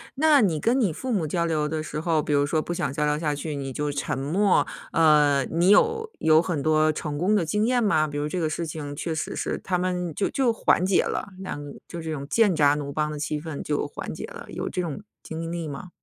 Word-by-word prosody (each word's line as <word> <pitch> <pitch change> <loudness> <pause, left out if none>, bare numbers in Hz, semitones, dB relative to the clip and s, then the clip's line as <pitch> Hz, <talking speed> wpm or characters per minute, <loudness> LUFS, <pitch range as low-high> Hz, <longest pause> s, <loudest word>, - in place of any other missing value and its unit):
那 300 0 +5
你 170 -8 +2
跟 245 - +2
你 200 -10 +1
父 260 - -4
母 190 -7 +1
交 170 +2 0
流 155 -2 0
的 155 +1 -2
时 150 -1 -5
候， 160 -1 +1
比 150 - -4
如 145 0 +3
说 155 +2 0
不 175 - -4
想 155 - -2
交 150 +1 0
流 150 0 +1
下 150 -1 -1
去， 145 +1 -4
你 135 -2 -5
就 150 +1 -2
沉 140 - -2
默， 180 +9 +2 0.3
呃， 150 -3 +4
你 170 +3 +1
有 450 - +4
有 160 0 +5
很 165 -5 -2
多 155 0 +3
成 150 -1 -4
功 185 +7 +2
的 180 - +2
经 210 +7 +1
验 245 0 +2
吗？ 155 -7 +3
比 145 -1 -5
如 145 0 -1
这 180 - -2
个 160 -2 0
事 170 +2 -3
情 150 -2 -6
确 165 +3 -3
实 155 - -3
是 - - -2
他 185 - 0
们 180 -2 -2
就 195 - 0
就 260 -3 +2
缓 185 -4 +2
解 190 - +3
了， - - -3
那 145 -6 -6
就 170 - -7
这 160 0 -4
种 140 -2 -5
剑拔弩张 150 -7 +2
的 150 - -5
气 150 +1 -2
氛 155 -3 -6
就 145 -1 -1
缓 - - -6
解 - - -6
了， - - -10
有 - - -4
这 180 - -2
种 170 0 -4 0.2
经 165 +1 -5
历 170 -2 -4
吗？ 150 +6 -7
160 Hz, 275 characters per minute, -25 LUFS, 150-180 Hz, 0.3 s, 那